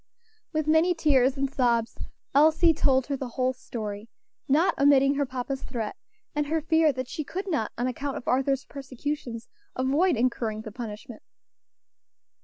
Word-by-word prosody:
With 310 Hz, -2 st, -1 dB
many 320 Hz, +3 st, +3 dB
tears 275 Hz, -4 st, +3 dB
and 275 Hz, 0 st, +1 dB
sobs 240 Hz, -4 st, 0 dB, 0.4 s
Elsie 315 Hz, +3 st, +5 dB
told 265 Hz, -3 st, +2 dB
her 280 Hz, -, -2 dB
the 265 Hz, -1 st, -5 dB
whole 255 Hz, 0 st, +1 dB
story, 215 Hz, -3 st, -6 dB, 0.4 s
not 310 Hz, +7 st, +3 dB
omitting 280 Hz, -1 st, +5 dB
her 285 Hz, -1 st, -1 dB
papa's 260 Hz, +1 st, -4 dB
threat, 230 Hz, -5 st, -4 dB, 0.4 s
and 295 Hz, 0 st, -1 dB
her 320 Hz, +2 st, +1 dB
fear 320 Hz, 0 st, +3 dB
that 255 Hz, -1 st, -5 dB
she 310 Hz, -, -4 dB
could 380 Hz, +7 st, -5 dB
not, 300 Hz, -, -1 dB
on 245 Hz, -, -1 dB
account 270 Hz, +2 st, -3 dB
of -, -, -9 dB
Arthur's 270 Hz, +1 st, +1 dB
persecutions, 265 Hz, -3 st, -5 dB, 0.3 s
avoid 280 Hz, +5 st, +2 dB
incurring 230 Hz, -3 st, -1 dB
the 215 Hz, -, -8 dB
punishment. 220 Hz, 0 st, -8 dB
270 Hz, 155 wpm, -26 LUFS, 245-295 Hz, 0.4 s, Elsie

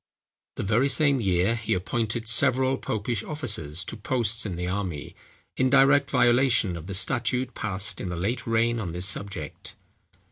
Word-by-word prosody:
The -, -, -4 dB
very 115 Hz, +7 st, +2 dB
same 140 Hz, -2 st, +3 dB
year 95 Hz, +2 st, +1 dB
he 115 Hz, -4 st, -1 dB
appointed 115 Hz, +4 st, -2 dB
several 130 Hz, +3 st, +3 dB
popish 110 Hz, 0 st, -2 dB
officers 100 Hz, -, -3 dB
to -, -, -6 dB
posts 115 Hz, 0 st, -1 dB
in 95 Hz, -, -4 dB
the 90 Hz, +1 st, -4 dB
army, 90 Hz, -6 st, -4 dB, 0.4 s
in 130 Hz, -, +2 dB
direct 140 Hz, +1 st, +4 dB
violation 120 Hz, -6 st, +3 dB
of 85 Hz, 0 st, -8 dB
the 100 Hz, -, -3 dB
statute 125 Hz, +3 st, 0 dB
passed 100 Hz, -2 st, -3 dB
in 95 Hz, -, -4 dB
the 90 Hz, -, -4 dB
late 115 Hz, +8 st, -3 dB
reign 115 Hz, +1 st, +1 dB
on 90 Hz, -6 st, -4 dB
this 90 Hz, +1 st, -2 dB
subject. 100 Hz, -6 st, -3 dB
115 Hz, 165 wpm, -25 LUFS, 95-125 Hz, 0.4 s, direct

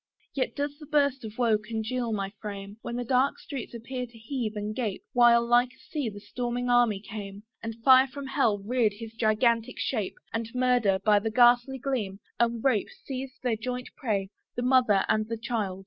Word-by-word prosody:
Yet 260 Hz, -2 st, -1 dB
does 285 Hz, 0 st, -3 dB
that 300 Hz, -2 st, -12 dB
burst 280 Hz, -4 st, +2 dB
of 220 Hz, -1 st, -8 dB
woe 230 Hz, -4 st, +3 dB
congeal 225 Hz, +2 st, -3 dB
my 200 Hz, -2 st, -2 dB
frame, 200 Hz, 0 st, -7 dB
When 235 Hz, -, -5 dB
the 245 Hz, -, -2 dB
dark 255 Hz, +3 st, +2 dB
streets 260 Hz, -4 st, -7 dB
appeared 250 Hz, +2 st, -5 dB
to 235 Hz, -, -16 dB
heave 225 Hz, -1 st, -4 dB
and 210 Hz, +1 st, -3 dB
gape, 215 Hz, -6 st, -3 dB
While 235 Hz, -1 st, +6 dB
like 245 Hz, +1 st, +3 dB
a -, -, -27 dB
sea 290 Hz, -7 st, -1 dB
the 205 Hz, -1 st, -9 dB
storming 245 Hz, +3 st, -3 dB
army 240 Hz, -5 st, +4 dB
came, 200 Hz, -1 st, -8 dB, 0.2 s
And 225 Hz, 0 st, -5 dB
Fire 260 Hz, +1 st, +7 dB
from 280 Hz, +1 st, -8 dB
Hell 265 Hz, -6 st, +2 dB
reared 230 Hz, -1 st, +1 dB
his 225 Hz, +1 st, -9 dB
gigantic 230 Hz, 0 st, +1 dB
shape, 215 Hz, -7 st, -2 dB, 0.2 s
And 225 Hz, 0 st, -2 dB
Murder, 250 Hz, -6 st, +3 dB
by 210 Hz, -1 st, +6 dB
the 225 Hz, +2 st, -2 dB
ghastly 245 Hz, +3 st, +4 dB
gleam, 230 Hz, -7 st, -2 dB, 0.2 s
and 235 Hz, -1 st, +1 dB
Rape 250 Hz, -7 st, +2 dB, 0.2 s
Seized 265 Hz, +1 st, -6 dB
their 245 Hz, -3 st, +1 dB
joint 250 Hz, +3 st, -4 dB
prey, 205 Hz, -7 st, -2 dB, 0.2 s
the 245 Hz, -, -2 dB
mother 245 Hz, -6 st, +4 dB
and 215 Hz, 0 st, +1 dB
the 230 Hz, -, -2 dB
child! 215 Hz, -5 st, -2 dB
235 Hz, 195 wpm, -28 LUFS, 215-255 Hz, 0.2 s, Fire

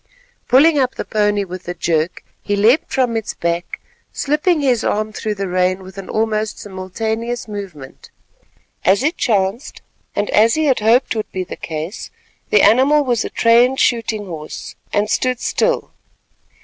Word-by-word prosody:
Pulling 290 Hz, +4 st, +5 dB
up 255 Hz, -1 st, 0 dB
the -, -, -4 dB
pony 210 Hz, -2 st, +1 dB
with 185 Hz, -1 st, -9 dB
a 175 Hz, -, -4 dB
jerk, 160 Hz, 0 st, -1 dB, 0.2 s
he 205 Hz, -, -1 dB
leapt 225 Hz, +9 st, +3 dB
from 250 Hz, -3 st, +1 dB
its 220 Hz, -2 st, -3 dB
back, 170 Hz, +1 st, -3 dB, 0.3 s
slipping 300 Hz, +3 st, +1 dB
his 255 Hz, -5 st, +2 dB
arm 215 Hz, +1 st, -1 dB
through 215 Hz, 0 st, -3 dB
the 195 Hz, -1 st, -3 dB
rein 185 Hz, +1 st, 0 dB
with 190 Hz, 0 st, -12 dB
an 190 Hz, -, -9 dB
almost 220 Hz, -1 st, -1 dB
simultaneous 220 Hz, +5 st, -4 dB
movement. 190 Hz, -10 st, -9 dB, 0.7 s
As 195 Hz, +6 st, +3 dB
it 315 Hz, +4 st, +1 dB
chanced, 210 Hz, +4 st, -1 dB, 0.3 s
and 205 Hz, -, 0 dB
as 225 Hz, +2 st, +4 dB
he 315 Hz, 0 st, +1 dB
had 265 Hz, -5 st, +2 dB
hoped 230 Hz, +3 st, +3 dB
would 215 Hz, -, -4 dB
be 185 Hz, -, -3 dB
the 180 Hz, -, -8 dB
case, 160 Hz, +5 st, -6 dB, 0.4 s
the 435 Hz, -, +4 dB
animal 280 Hz, +5 st, +5 dB
was 245 Hz, -4 st, 0 dB
a -, -, -4 dB
trained 240 Hz, +3 st, +3 dB
shooting 225 Hz, -3 st, +1 dB
horse, 155 Hz, -4 st, -8 dB, 0.2 s
and 205 Hz, +1 st, +1 dB
stood 255 Hz, +2 st, 0 dB
still. -, -, 0 dB
215 Hz, 160 wpm, -18 LUFS, 190-250 Hz, 0.7 s, Pulling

